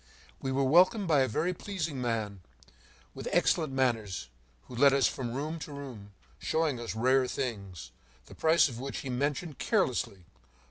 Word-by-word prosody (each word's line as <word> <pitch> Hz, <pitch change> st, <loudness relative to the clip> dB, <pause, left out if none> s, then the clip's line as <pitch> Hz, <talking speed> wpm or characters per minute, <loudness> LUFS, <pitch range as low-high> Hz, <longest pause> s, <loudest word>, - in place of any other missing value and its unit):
We 135 Hz, -, -2 dB
were 135 Hz, +1 st, +1 dB
welcomed 185 Hz, -, +5 dB
by 155 Hz, -4 st, +4 dB
a 130 Hz, -, +3 dB
very 160 Hz, +11 st, 0 dB
pleasing 165 Hz, -8 st, -4 dB
man, 110 Hz, -5 st, -2 dB, 0.7 s
with -, -, -7 dB
excellent 155 Hz, -4 st, +2 dB
manners, 115 Hz, -, -1 dB, 0.3 s
who 125 Hz, -, -11 dB
led 140 Hz, +2 st, +6 dB
us 135 Hz, -2 st, +4 dB
from 120 Hz, -3 st, -4 dB
room 155 Hz, +4 st, -3 dB
to 150 Hz, -, -7 dB
room, 125 Hz, -8 st, -9 dB, 0.3 s
showing 160 Hz, -6 st, 0 dB
us 120 Hz, -1 st, -5 dB
rare 130 Hz, +3 st, +3 dB
things, 100 Hz, -, -5 dB, 0.3 s
the -, -, -13 dB
price 160 Hz, +1 st, +4 dB
of 120 Hz, -4 st, -7 dB
which 135 Hz, +2 st, -4 dB
he 130 Hz, -, -5 dB
mentioned 145 Hz, +4 st, -2 dB
carelessly. 95 Hz, -3 st, 0 dB
135 Hz, 165 wpm, -30 LUFS, 115-155 Hz, 0.7 s, led